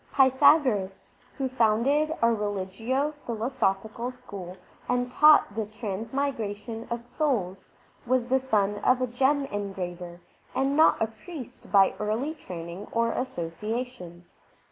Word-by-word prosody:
Pythagoras, 260 -7 +4 0.3
who 270 - 0
founded 260 +5 +2
a 230 0 +5
religio 210 +7 -2
philosophical 235 -4 -2
school 200 -8 -9 0.3
and 245 0 0
taught 300 -5 +6
the 220 -1 -3
transmigra 220 +2 -3
tion 225 +2 -8
of 235 0 -4
souls, 230 - -2 0.4
was 255 -1 +2
the 260 +2 +2
son 205 -5 0
of 255 +4 +3
a 255 - +1
gem 270 +4 +1
engraver 180 -4 -5 0.4
and 270 +1 +1
not 315 +2 +5
a - - +2
priest 250 +3 -10
by 195 -2 +5
early 225 +9 -1
training 175 - -8
or 230 0 +1
association. 215 -3 -5
230 Hz, 120 wpm, -27 LUFS, 200-260 Hz, 0.4 s, taught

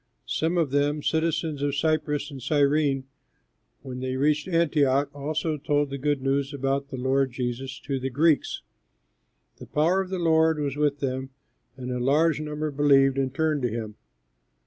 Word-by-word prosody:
Some 165 +3 -1
of 160 -6 +1
them, 145 +1 +1
citizens 160 -2 0
of 145 -1 0
Cyprus 150 -1 0
and 135 -2 -8
Cyrene, 145 0 +2 0.8
when 130 -2 -6
they 130 0 -3
reached 150 +4 +1
Antioch 145 -5 +2
also 155 +2 -2
told 145 0 0
the 140 - -4
good 145 -1 0
news 140 +1 0
about 135 +1 -1
the 130 - -6
Lord 130 +1 +1
Jesus 125 +2 -4
to 135 -2 -3
the 130 +1 -3
Greeks. 150 +4 +1 0.9
The - - -11
power 170 +6 +2
of 190 - -6
the 190 - -2
Lord 160 -2 +3
was 145 -2 -2
with 145 -1 0
them, 130 -1 -2 0.5
and 125 -1 -5
a 125 - -2
large 150 +4 +2
number 150 0 -3
believed 135 -1 +4
and 135 -1 0
turned 155 +1 0
to 120 - 0
him. 110 -1 -5
145 Hz, 170 wpm, -26 LUFS, 135-155 Hz, 0.9 s, believed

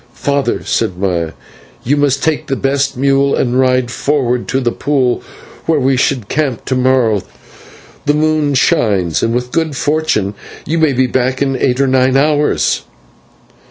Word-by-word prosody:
"Father," 140 -1 -1
said 90 - -1
Maya, 85 -4 -1 0.5
"you 140 +5 +1
must 140 -2 +1
take 160 -2 0
the 135 - -1
best 135 0 -1
mule 140 +1 +2
and 125 0 0
ride 130 -2 +2
forward 125 -4 -1
to 135 - 0
the 120 -3 0
pool 130 -3 0 0.5
where 160 -2 +2
we 135 0 +2
should 125 -4 0
camp 140 -4 -2
to 130 - -1
morrow. 125 -5 +2 0.9
The 145 - +3
moon 155 -2 +1
shines, 100 - +1
and 115 - 0
with 125 +1 -2
good 160 -4 -1
fortune 150 -11 0 0.3
you 165 +3 -1
may 155 -3 +3
be 130 +1 +2
back 130 +1 -1
in 135 -1 0
eight 125 0 0
or 140 - +3
nine 130 0 +2
hours." 150 +1 +1
130 Hz, 160 wpm, -15 LUFS, 125-145 Hz, 0.9 s, The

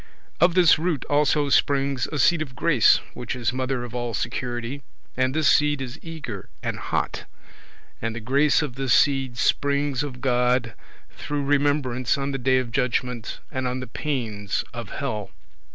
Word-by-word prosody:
Of 175 0 +4
this 175 -5 +6
root 165 -4 -1
also 145 0 +3
springs 140 -2 +2
a 150 - -4
seed 170 +3 +4
of 135 -5 -5
grace, 130 -5 +4
which 125 0 -5
is 120 -1 -1
mother 130 -1 -2
of 120 -1 -8
all 120 -2 -2
security, 120 +2 -3 0.3
and 130 0 +1
this 155 -2 +2
seed 150 -1 +4
is 130 +2 -6
eager 150 - -7
and - - -3
hot; - - -2 0.8
and 115 0 -2
the - - -4
grace 140 +7 +3
of 145 -5 -4
this 130 -2 +2
seed 135 -4 +2
springs 140 +1 +1
of 135 -4 -5
God, 125 -2 +1 0.4
through 145 -1 -4
remembrance 140 -3 +1
on 140 0 -2
the 135 - -3
day 130 +1 +3
of 125 -2 -2
judgment 125 -2 -2
and 130 -1 -2
on 125 +1 -2
the 130 - -5
pains 115 -7 -3
of 115 -3 -6
hell. 110 -8 -4
130 Hz, 170 wpm, -24 LUFS, 120-145 Hz, 0.8 s, this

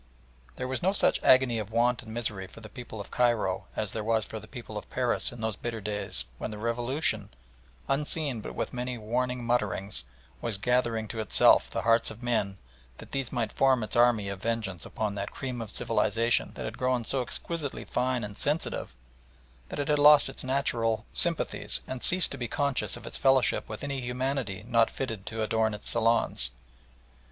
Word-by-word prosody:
There 130 - -3
was 130 0 -2
no 190 +3 +2
such - - +2
agony 130 -3 +5
of 105 -1 -5
want 120 +2 +2
and 110 -3 -10
misery 110 -5 -3
for 105 - -13
the 110 -1 -10
people 120 -4 -8
of 100 - -8
Cairo 120 -3 +1
as 105 -3 -2
there 110 - -3
was 110 -1 +2
for 110 - -6
the 110 - -13
people 120 -3 -9
of 105 - -6
Paris 125 -2 0
in 120 -2 -9
those 110 -2 -1
bitter 115 0 -4
days 105 0 -2
when - - -3
the 105 - -6
Revolution, 115 -1 +1 0.6
unseen 140 -3 -1
but - - -7
with - - -3
many 125 0 -3
warning 125 +3 -1
mutterings, 105 - 0 0.4
was 115 -4 -2
gathering 115 0 +1
to 115 - -5
itself 110 - +5
the - - -3
hearts 115 0 +4
of 110 +2 -10
men 105 -5 0 0.4
that - - -12
these 135 -3 -2
might 115 -4 -1
form 130 -3 +3
its 110 - -4
army 120 -4 +4
of 100 -1 -5
vengeance 110 -6 -2
upon 105 -2 -2
that 100 0 -3
"cream 125 -3 -5
of 110 - -6
civilisation" 115 +2 +1
that - - -5
had - - -6
grown 125 -1 +1
so 135 +3 0
exquisitely 140 +5 -4
fine 125 -1 0
and 105 0 -7
sensitive 145 - -1 0.7
that - - -5
it 145 -1 -1
had 150 -1 +2
lost 150 -1 +7
its - - -5
natural 120 -4 0
sympathies - - 0
and 130 -1 -5
ceased 180 -1 +5
to 140 - -6
be 120 - -2
conscious 140 +2 0
of - - -11
its - - -3
fellowship 135 -1 +3
with 110 +3 -6
any 140 -2 -3
humanity 125 -4 -2
not 115 -2 +4
fitted 115 -7 -5
to 110 0 -2
adorn 110 0 +1
its 105 - -9
salons. 115 - +2
115 Hz, 195 wpm, -29 LUFS, 110-130 Hz, 0.7 s, lost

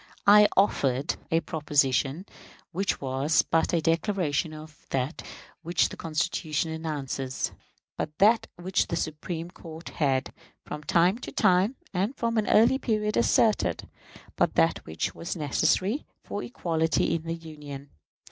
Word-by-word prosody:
I 210 +1 +8
offered 140 -8 +2
a 165 0 +2
proposition, 145 +1 0 0.5
which 190 +3 -1
was 135 +4 +1
but 165 - +1
the 170 - +1
declaration 165 -2 0
of 155 -1 -12
that 135 +4 -2 0.4
which 170 0 +1
the - - -8
Constitution 160 0 -1
announces; 140 -5 -3 0.5
but 150 0 -4
that 220 +3 +4
which 185 +2 0
the - - -2
Supreme 165 +2 -4
Court 165 -2 -10
had, 135 -3 0 0.3
from 150 - -6
time 180 +8 +3
to - - -7
time, 185 +7 +3 0.2
and 195 +8 0
from 230 -1 0
an 210 - -1
early 235 +5 +5
period 215 -4 0
asserted; 210 - +2 0.5
but - - +1
that - - +3
which 80 0 -2
was 170 - -5
necessary 185 - +1 0.2
for 205 - -4
equality 165 -9 0
in 165 - -1
the 165 +1 -4
Union. 150 -4 -10
165 Hz, 140 wpm, -27 LUFS, 150-190 Hz, 0.5 s, I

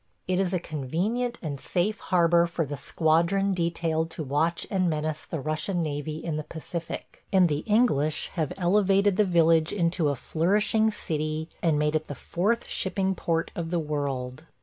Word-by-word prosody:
It 185 0 +1
is 190 -2 +1
a 185 - +1
convenient 180 - -2
and 145 -4 -4
safe 200 +4 0
harbor 170 -1 +3
for 170 -1 -2
the 145 +1 -5
squadron 170 +7 +2
detailed 165 -2 0
to 165 - -5
watch 150 +5 0
and 185 -3 +2
menace 155 -1 -2
the 160 - -4
Russian 155 +5 -1
navy 150 0 -3
in 160 -1 -3
the 155 - -3
Pacific; 165 +2 -7
and 185 -2 +5
the 150 -2 0
English 210 - +2
have 160 -1 -2
elevated 195 +1 +3
the 210 +1 +3
village 165 -3 +4
into 170 -4 +1
a 140 - 0
flourishing 205 - +2
city 155 -5 -3
and 160 -3 +2
made 150 +1 +1
it 155 0 -1
the 145 - -5
fourth 210 - -1
shipping 190 0 0
port 165 -2 -1
of 165 -1 -4
the 175 - 0
world. 145 -3 -3
165 Hz, 170 wpm, -27 LUFS, 155-190 Hz, -, and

